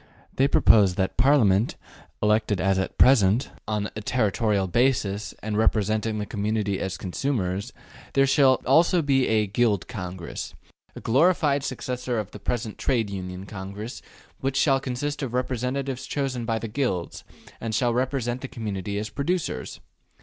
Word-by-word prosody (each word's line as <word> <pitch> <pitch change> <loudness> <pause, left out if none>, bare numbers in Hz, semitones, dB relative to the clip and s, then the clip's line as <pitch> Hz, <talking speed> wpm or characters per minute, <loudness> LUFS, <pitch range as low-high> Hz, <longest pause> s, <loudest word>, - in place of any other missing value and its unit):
They 135 - +3
propose 100 -8 +5
that, 95 0 0
in - - -34
addition - - -41
to - - +5
Parliament, 115 -7 +4 0.5
elected 105 -2 +2
(as 95 0 +2
at 95 - -3
present) 120 -2 +4 0.2
on 105 -1 -2
a 110 - -4
territorial 105 -3 +1
basis 110 -1 0
and 110 -1 -2
representing 110 0 +1
the 105 - -2
community 105 -2 -1
as 95 0 -3
consumers, 95 -2 -2 0.4
there 135 0 +4
shall 135 -1 +4
also 165 +5 +4
be 135 -2 +2
a 110 -1 +2
``Guild 100 -3 +1
Congress,'' 90 -4 -6 0.4
a - - -8
glorified 145 +1 +3
successor 125 -2 -3
of 105 -3 -3
the - - -10
present 115 -3 -3
Trade 115 -6 0
Union 90 -1 -6
Congress, 100 +3 -7 0.4
which 135 0 -1
shall 135 -2 +3
consist 140 +3 -3
of 125 -3 -3
representatives 130 +1 -2
chosen 135 -4 -2
by 115 -1 0
the 115 - -4
Guilds, 105 -7 -2 0.4
and 115 -1 -3
shall 120 0 +2
represent 125 -1 -1
the 135 - -5
community 100 -4 -4
as 105 +1 -3
producers. 150 - -3
115 Hz, 155 wpm, -25 LUFS, 100-130 Hz, 0.5 s, propose